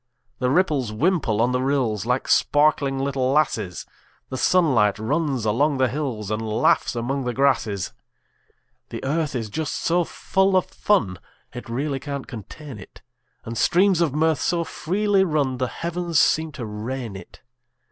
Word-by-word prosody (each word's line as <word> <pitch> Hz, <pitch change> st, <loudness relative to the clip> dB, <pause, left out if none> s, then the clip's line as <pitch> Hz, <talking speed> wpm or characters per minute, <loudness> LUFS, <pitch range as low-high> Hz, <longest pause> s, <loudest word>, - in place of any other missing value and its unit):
The 125 Hz, -, +1 dB
ripples 145 Hz, -, +1 dB
wimple 120 Hz, -, +1 dB
on 125 Hz, -, +1 dB
the 125 Hz, 0 st, 0 dB
rills, 125 Hz, -6 st, 0 dB
Like 125 Hz, +1 st, 0 dB
sparkling 145 Hz, -2 st, +3 dB
little 135 Hz, -1 st, 0 dB
lasses; 135 Hz, -, 0 dB, 0.4 s
The -, -, -5 dB
sunlight 130 Hz, -, +3 dB
runs 130 Hz, +2 st, -1 dB
along 140 Hz, +7 st, +2 dB
the 130 Hz, -1 st, +2 dB
hills, 120 Hz, -7 st, -3 dB
And 110 Hz, +1 st, -1 dB
laughs 110 Hz, +2 st, +1 dB
among 130 Hz, +3 st, -2 dB
the 125 Hz, -1 st, -2 dB
grasses. 115 Hz, -8 st, +1 dB, 1.0 s
The -, -, -7 dB
earth 145 Hz, +1 st, -1 dB
is 115 Hz, -3 st, -2 dB
just 145 Hz, +9 st, -3 dB
so 175 Hz, +1 st, +1 dB
full 190 Hz, +3 st, +1 dB
of 185 Hz, -, +2 dB
fun 100 Hz, -, 0 dB, 0.3 s
It 125 Hz, -1 st, -8 dB
really 135 Hz, +3 st, -2 dB
can't 140 Hz, -1 st, -5 dB
contain 125 Hz, +3 st, -9 dB
it; 95 Hz, -, -14 dB, 0.4 s
And 115 Hz, -, -5 dB
streams 180 Hz, -, +3 dB
of 165 Hz, -4 st, +2 dB
mirth 160 Hz, -2 st, +2 dB
so 170 Hz, -1 st, +1 dB
freely 195 Hz, +4 st, +1 dB
run 145 Hz, -7 st, 0 dB
The 130 Hz, -, 0 dB
heavens 170 Hz, +2 st, -1 dB
seem 160 Hz, 0 st, +2 dB
to 120 Hz, -, -6 dB
rain 110 Hz, +1 st, -5 dB
it. 95 Hz, -, -12 dB
135 Hz, 155 wpm, -23 LUFS, 115-160 Hz, 1.0 s, sparkling